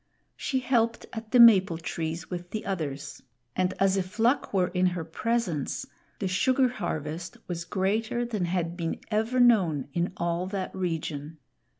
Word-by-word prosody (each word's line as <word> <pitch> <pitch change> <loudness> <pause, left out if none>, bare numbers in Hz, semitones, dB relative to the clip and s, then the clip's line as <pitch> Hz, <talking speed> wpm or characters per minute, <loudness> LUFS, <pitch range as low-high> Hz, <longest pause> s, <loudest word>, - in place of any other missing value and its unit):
She 265 -2 -1
helped 235 -3 +1
at 225 -2 -6
the 250 - +4
maple 195 -7 +7
trees 165 0 -4
with 175 -1 -6
the 215 - -4
others; 145 -7 -4 0.3
and 185 0 +1
as 195 0 +3
if 185 +2 -3
luck 240 +5 +2
were 185 -2 +2
in 180 0 +2
her 175 -2 -2
presence, 175 - -1 0.3
the 195 - -2
sugar 255 +7 +3
harvest 160 -7 -4
was 170 -1 -4
greater 215 +6 0
than 215 -6 -1
had 170 -1 -1
been 165 -2 -3
ever 225 +4 +1
known 185 - +4
in 175 +1 0
all 170 +1 -1
that 190 -1 -4
region. 160 -4 -3
185 Hz, 160 wpm, -27 LUFS, 170-225 Hz, 0.3 s, maple